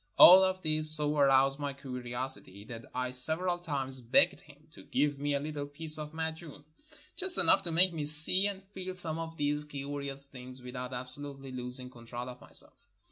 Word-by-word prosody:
All 185 +2 +9
of 185 0 -2
this 155 0 +1
so 150 -1 +2
aroused 135 -1 +2
my 145 -1 -4
curiosity 125 -7 -5
that 115 -1 -10
I 125 0 -3
several 160 +8 0
times 135 -6 -4
begged 120 +1 +2
him 150 +1 -21
to - - -15
give 145 -1 -2
me 145 0 -2
a - - -1
little 145 0 -6
piece 155 +2 +3
of 150 0 -7
madjun, 160 -2 -7 0.5
just 375 -2 +6
enough - - +3
to 170 - 0
make 175 +2 +3
me 155 -3 -4
see 160 +6 +7
and 195 -1 -7
feel 190 -2 -9
some 165 -3 -4
of 165 0 -8
these 145 0 -2
curious 140 -1 -7
things 130 -1 -10
without 125 0 -8
absolutely 135 +2 -8
los 125 0 -3
ing 125 0 -10
control 120 +1 -9
of 125 0 -12
myself. - - -4
145 Hz, 190 wpm, -29 LUFS, 130-160 Hz, 0.5 s, All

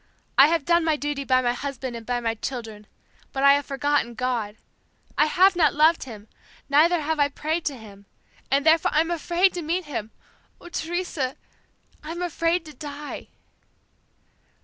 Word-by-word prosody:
I 275 - +8
have 330 -3 0
done 340 0 +3
my 320 -1 +2
duty 290 -1 -3
by 255 -1 +2
my 240 0 +1
husband 260 -1 -5
and 230 -1 -9
by 245 -1 0
my 230 -1 -1
children, 225 -3 -6 0.4
but 270 - -2
I 280 0 +8
have 285 0 0
forgotten 280 -3 0
God. 230 -4 -2 0.6
I 300 - +3
have 375 +4 +4
not 320 -4 +3
loved 315 +1 +4
Him, 215 -4 -10 0.4
neither 315 +4 +4
have 310 +1 -2
I 285 0 +3
prayed 315 +4 -3
to 280 -3 -2
Him 200 -3 -14 0.4
and 280 +2 +2
therefore 320 0 +4
I'm 325 +3 +2
afraid 345 +3 +2
to 355 - -4
meet 340 +3 -2
Him. 235 -7 -5 0.5
Oh, 350 - -12
Teresa, 330 -6 -3 0.7
I'm 330 +3 -5
afraid 335 0 0
to 305 - -11
die." 290 +1 -8
290 Hz, 170 wpm, -24 LUFS, 255-330 Hz, 0.7 s, I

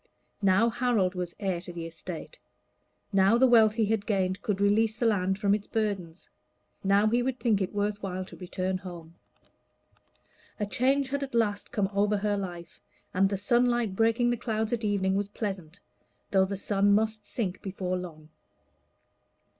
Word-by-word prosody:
Now 200 +4 +4
Harold 235 -6 +1
was 180 -2 -4
heir 190 -4 -1
to 175 - -7
the 170 -1 -6
estate; 165 - -8 0.7
now 195 +4 +5
the 260 - +5
wealth 225 -4 +5
he 225 -1 +2
had 210 -1 -1
gained 190 -2 0
could 200 -2 -1
release 210 +2 +3
the 235 - -1
land 190 -4 +2
from 200 -1 +2
its 210 0 -2
burdens; 195 -6 -3 0.6
now 200 +2 +4
he 235 +3 +2
would 255 0 -2
think 225 -4 +2
it 190 - -1
worth 205 0 -2
while 185 -1 -4
to - - -12
return 185 +1 -3
home. 170 -3 -10 1.5
A 210 - 0
change 265 +6 +1
had 280 0 -1 0.5
come 195 -2 0
over 205 +1 +2
her 205 0 0
life, 175 -4 -6 0.3
and 195 +1 +3
the 200 - -1
sunlight 240 0 +1
breaking 230 +3 +2
the 240 - 0
clouds 220 -1 -2
at 235 -1 -2
evening 200 -2 +1
was 200 +1 0
pleasant, 195 -5 -5 0.5
though 190 -1 +4
the 195 +1 -4
sun 200 +1 +2
must 215 0 0
sink 190 -6 -3
before 185 -2 -3
long. 160 -4 -8
200 Hz, 165 wpm, -28 LUFS, 190-220 Hz, 1.5 s, now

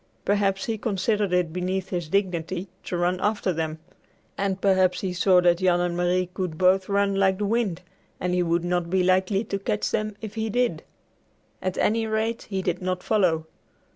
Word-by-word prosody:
Perhaps 195 -1 +1
he 225 -2 -2
considered 205 -1 0
it 180 -3 +1
beneath 185 +1 -2
his 175 -4 -3
dignity 185 -1 -1 0.2
to 180 - -2
run 175 +1 +1
after 205 -2 0
them, 160 -1 -3 0.6
and 195 -1 -1
perhaps 185 -2 +3
he 185 -2 -2
saw 185 0 +4
that 175 -1 +3
Jan 180 -2 +3
and 175 -1 0
Marie 180 +1 +1
could 180 -4 -3
both 185 +2 +3
run 200 0 +2
like 195 -1 +2
the 210 - -1
wind 200 -5 0 0.4
and 180 0 -1
he 180 - +2
would 170 0 0
not 175 -1 0
be 185 +1 +2
likely 185 +3 +2
to 200 -3 -3
catch 205 +1 -1
them 215 -1 -1
if 215 -2 -7
he 220 0 -2
did. 245 +3 0 0.8
At 185 -1 -2
any 225 +1 +1
rate, 220 +2 -2
he 190 -2 -2
did 180 0 -1
not 185 0 -2
follow. 180 -7 +2
185 Hz, 190 wpm, -25 LUFS, 180-200 Hz, 0.8 s, saw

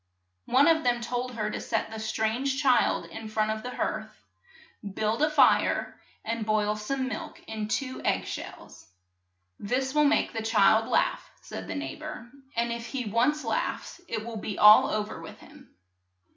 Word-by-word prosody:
One 275 +4 +5
of 325 -1 +4
them 245 -1 +2
told 245 +1 -3
her 215 -2 -2
to - - -4
set 220 -1 -2
the 220 - -6
strange 220 +5 -1
child 260 -4 +3
in 225 - -8
front 215 0 0
of 220 0 -3
the 250 - -6
hearth, - - -2 0.9
build 220 +3 0
a 305 - +4
fire, 305 -1 +3 0.3
and 230 0 -2
boil 210 -1 +1
some 260 +5 -2
milk 315 +3 -6
in 215 -1 -4
two 255 +3 -3
egg - - 0
shells. - - -8 0.7
^r^?% - - -6
"This 265 +2 0
will 300 0 +4
make 290 - +2
the 225 - -3
child 220 0 +4
laugh," - - +1
said - - -7
the - - -4
neigh 285 - -5
bor, 275 -6 -8 0.2
and 235 0 0
if 235 0 -6
he 255 -2 -4
once 245 +8 +1
laughs - - -3
it 220 -1 -4
will 235 -1 -6
be 210 -1 -5
all 210 +1 +8
o 215 - 0
ver 210 - -9
with - - -10
him." - - -16
235 Hz, 185 wpm, -27 LUFS, 215-265 Hz, 0.9 s, all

